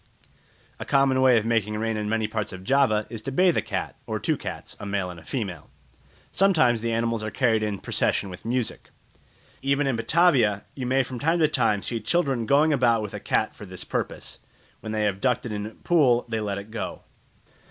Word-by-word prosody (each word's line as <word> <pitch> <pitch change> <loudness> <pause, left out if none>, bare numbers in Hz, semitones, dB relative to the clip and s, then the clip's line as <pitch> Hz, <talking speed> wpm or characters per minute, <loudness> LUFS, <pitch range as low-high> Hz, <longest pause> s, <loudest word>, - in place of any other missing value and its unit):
A - - -4
common 135 -2 +3
way 130 -2 +6
of 110 - 0
making 105 -2 0
rain 115 +1 -1
in 105 -1 -2
many 110 -1 0
parts 110 -1 -3
of 95 -1 -9
Java 110 -3 +2
is 115 -2 -6
to 135 - -4
bathe 180 +5 +3
a - - +2
cat - - -4
or - - -2
two - - 0
cats, - - -7
a - - -7
male 100 -2 -2
and 85 - -10
a - - -16
female; 95 - -5 0.6
sometimes 155 - +3
the 115 0 -1
animals 115 0 0
are 110 - -3
carried 115 -1 +1
in 105 -2 -1
procession 95 +1 0
with 90 - -10
music. 120 0 -2 0.7
Even 140 +1 +1
in 135 -3 +1
Batavia 115 - +3
you 130 -3 -4
may 135 +1 +3
from 130 -1 -7
time 165 +5 +2
to 160 -2 +4
time 115 -8 +1
see 115 - -2
children 135 -3 0
going 150 +4 +4
about 120 -5 +3
with 105 - -6
a - - -5
cat - - 0
for - - -11
this - - -7
purpose; - - -4 0.4
when 110 - -6
they 110 -1 0
have 100 -2 -1
ducked 125 -2 +1
it 115 - -4
in 105 0 -3
a - - -6
pool, 125 -1 +2
they 110 -1 -2
let 100 -2 -2
it 100 +2 -8
go. 115 - -5
115 Hz, 215 wpm, -25 LUFS, 105-135 Hz, 0.7 s, way